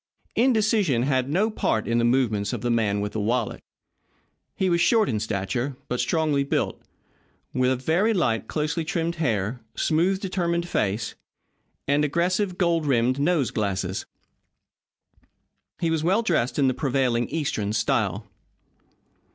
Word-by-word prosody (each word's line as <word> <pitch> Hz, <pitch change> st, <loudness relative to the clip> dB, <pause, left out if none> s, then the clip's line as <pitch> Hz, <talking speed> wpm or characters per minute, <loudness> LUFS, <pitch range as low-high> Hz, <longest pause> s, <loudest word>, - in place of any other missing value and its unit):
Indecision 215 Hz, -, +2 dB
had 130 Hz, -1 st, +1 dB
no 200 Hz, +9 st, +1 dB
part 110 Hz, -, 0 dB
in 115 Hz, 0 st, +2 dB
the -, -, +1 dB
movements 115 Hz, -5 st, +1 dB
of -, -, -3 dB
the 120 Hz, -, 0 dB
man 105 Hz, -3 st, +1 dB
with 105 Hz, 0 st, -3 dB
the 110 Hz, -, -3 dB
wallet. 115 Hz, +2 st, -1 dB, 0.9 s
He 190 Hz, -, 0 dB
was 170 Hz, -1 st, +2 dB
short 220 Hz, +2 st, +4 dB
in 110 Hz, -, -1 dB
stature, 110 Hz, +6 st, -2 dB
but 125 Hz, -, -1 dB
strongly 155 Hz, -4 st, +1 dB
built, 140 Hz, -, -1 dB, 0.7 s
with 130 Hz, 0 st, +1 dB
very 180 Hz, -, +2 dB
light, 135 Hz, -, 0 dB
closely 155 Hz, +1 st, -1 dB
trimmed 165 Hz, +1 st, -2 dB
hair, 115 Hz, -, -1 dB
smooth, 175 Hz, +4 st, +1 dB
determined 175 Hz, -3 st, -1 dB
face, 105 Hz, -, -1 dB, 0.7 s
and 145 Hz, +2 st, +2 dB
aggressive, 180 Hz, +5 st, 0 dB
gold 170 Hz, -4 st, +1 dB
rimmed 130 Hz, 0 st, +2 dB
nose 150 Hz, -3 st, +1 dB
glasses. 95 Hz, -3 st, -2 dB, 1.7 s
He 165 Hz, -1 st, 0 dB
was 160 Hz, -1 st, 0 dB
well 195 Hz, +7 st, +2 dB
dressed 155 Hz, -, 0 dB
in 140 Hz, -2 st, +3 dB
the 130 Hz, -, +2 dB
prevailing 125 Hz, -4 st, 0 dB
Eastern 140 Hz, -10 st, -2 dB
style. 105 Hz, -2 st, 0 dB
140 Hz, 140 wpm, -25 LUFS, 115-170 Hz, 1.7 s, short